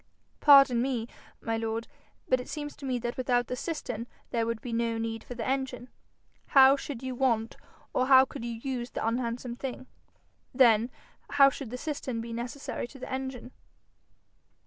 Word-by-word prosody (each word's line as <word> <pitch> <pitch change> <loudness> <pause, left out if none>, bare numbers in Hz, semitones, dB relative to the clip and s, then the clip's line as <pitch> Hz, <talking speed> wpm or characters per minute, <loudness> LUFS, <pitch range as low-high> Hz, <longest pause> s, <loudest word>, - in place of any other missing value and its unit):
'Pardon 275 -5 +7
me, 245 -3 -1 0.3
my 225 0 -1
lord, 225 0 -3 0.4
but 255 - +3
it 250 - -8
seems 295 -1 -5
to 275 - -8
me 255 -1 0
that 240 0 -4
without 245 -1 +1
the 250 - -4
cistern 245 -6 -4 0.2
there 230 -1 0
would 230 -1 -2
be 240 0 -6
no 230 0 0
need 225 0 -3
for 245 - -8
the 230 -2 -4
engine. 260 -2 -2 0.7
How 270 +1 +9
should 275 -3 -6
you 260 0 -3
want 235 -3 0 0.4
or 255 - +1
how 265 -1 +8
could 235 - -8
you 235 0 -3
use 250 -3 -3
the - - -3
unhandsome 235 +1 -2
thing? 260 -1 -5 0.7
Then 235 -2 +5 0.4
how 275 -1 +7
should 270 -3 -7
the 250 - -5
cistern 270 -4 -4
be 230 0 -6
necessary 240 +2 -4
to 270 - -13
the 255 - -8
engine?' 260 -2 -5
245 Hz, 175 wpm, -29 LUFS, 230-265 Hz, 0.7 s, How